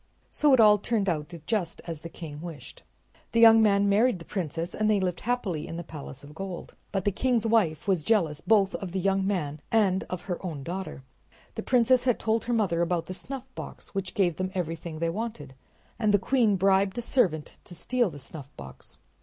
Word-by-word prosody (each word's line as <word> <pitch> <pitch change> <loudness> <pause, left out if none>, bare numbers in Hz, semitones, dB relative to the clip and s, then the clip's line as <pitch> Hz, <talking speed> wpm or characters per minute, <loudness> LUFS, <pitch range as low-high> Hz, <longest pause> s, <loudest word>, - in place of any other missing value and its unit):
So 300 -1 +3
it 260 - +6
all 210 -2 +7
turned 210 -1 -1
out 155 -3 -1
just 190 -6 -1
as 165 -3 -6
the 165 - -7
king 155 -3 -8
wished. 165 -4 -9 0.5
The 230 - +3
young 225 -1 +8
man 200 -2 +4
married 215 +3 +3
the 165 - -12
princess 170 -2 -4
and 215 0 0
they 210 -2 +3
lived 180 -2 -1
happily 200 -10 -2
in 165 - -6
the 170 - -5
palace 145 -4 -9
of 145 +1 -12
gold. 185 +1 -7 0.2
But 195 -2 -2
the 205 - +3
king's 235 +2 +1
wife 205 -10 +2
was 185 -5 +1
jealous 165 -7 +1
both 200 -2 +3
of 185 -3 -5
the 190 - 0
young 195 +1 +1
man 155 -7 -2
and 195 -4 +3
of 180 - -5
her 180 -1 -5
own 155 -7 -5
daughter. 180 -4 -5 0.5
The - - -4
princess 250 0 +3
had 245 -3 +3
told 225 0 0
her 240 - -1
mother 195 -7 +1
about 170 -1 0
the 185 - -6
snuffbox, 260 +5 -7
which 195 -2 -4
gave 175 -5 +2
them 185 0 -2
everything 165 -2 -4
they 165 +1 0
wanted, 175 - -5 0.5
and 215 -2 +2
the 205 - +5
queen 225 0 +2
bribed 195 +2 +2
a 240 - -2
servant 185 - 0
to 175 - -11
steal 245 +4 0
the 145 - -10
snuffbox. 135 - -10
190 Hz, 205 wpm, -27 LUFS, 165-220 Hz, 0.5 s, young